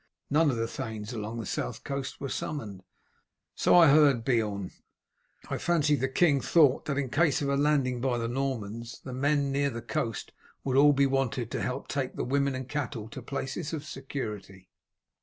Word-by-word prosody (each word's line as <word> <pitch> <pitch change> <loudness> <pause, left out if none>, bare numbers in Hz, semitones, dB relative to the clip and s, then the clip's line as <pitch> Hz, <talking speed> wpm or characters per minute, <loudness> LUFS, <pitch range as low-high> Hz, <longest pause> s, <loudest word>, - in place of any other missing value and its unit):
None 155 +1 +4
of 130 - 0
the 115 0 -1
thanes 110 -1 -5
along 110 +1 -4
the 115 - -5
south - - -4
coast 140 -1 -4
were 140 - -4
summoned." 110 -9 -4 0.7
"So - - +3
I 170 -3 +8
heard, 140 -5 +5
Beorn. 105 -7 0 0.8
I - - -3
fancy 155 -4 +2
the 135 -1 0
king 140 0 +3
thought 145 -6 +4
that 140 -2 -2
in 135 -3 -2
case 150 -2 +2
of 140 - 0
a 140 - +2
landing 140 -4 +1
by 125 -2 +1
the 115 -1 -2
Normans 120 -3 -3
the 130 - -7
men 140 +1 +1
near 140 +1 +1
the 115 -2 -6
coast 115 -1 -3 0.3
would 130 -2 -1
all 145 +2 +7
be 140 0 +3
wanted 130 -3 -1
to - - -2
help 125 - -3
take 135 -2 -3
the - - -2
women 140 +1 +1
and 130 -1 -5
cattle 120 -7 -4
to 130 - -8
places 140 +5 -4
of 155 -2 -4
security." 105 - -7
135 Hz, 190 wpm, -28 LUFS, 115-145 Hz, 0.8 s, I